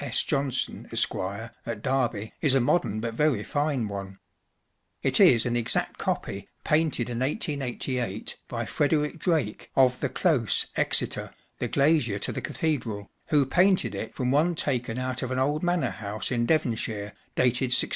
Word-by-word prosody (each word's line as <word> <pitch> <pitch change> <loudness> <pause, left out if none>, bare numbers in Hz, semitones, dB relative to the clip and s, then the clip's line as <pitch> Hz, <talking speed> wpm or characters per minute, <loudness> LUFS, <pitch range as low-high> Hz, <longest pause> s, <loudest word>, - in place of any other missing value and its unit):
S. - - +1
Johnson, 135 -2 -1
Esq,, - - +2
at 105 +3 -5
Derby, 120 -5 0
is 145 -4 +4
a - - +5
modern 120 -5 +1
but 115 0 -3
very 135 -4 +2
fine 145 -5 0
one; 100 -1 -6 0.9
it - - +3
is 115 -2 +6
an 120 -1 0
exact 120 -1 -1
copy, - - -3
painted 155 -6 +1
in 120 -1 -3
1888, 130 - -2
by 120 -1 -3
Frederick 150 +6 0
Drake, 155 - -1
of 125 -1 +4
the - - -1
Close, 145 - +2
Exeter, - - 0 0.2
the - - -1
glazier 140 -7 +2
to 100 - -3
the - - -4
Cathedral, 115 -10 -2 0.2
who 145 -3 +3
painted 185 +7 +3
it - - -5
from 125 -2 0
one 160 +5 +3
taken 125 -6 -1
out 130 0 -2
of 130 - -2
an 130 - -2
old 145 +4 +1
manor 175 -1 +1
house 105 +2 -4
in 120 -1 +1
Devonshire, 110 -8 0 0.2
dated 125 +1 +2
1660. 125 - +3
125 Hz, 160 wpm, -27 LUFS, 115-150 Hz, 0.9 s, is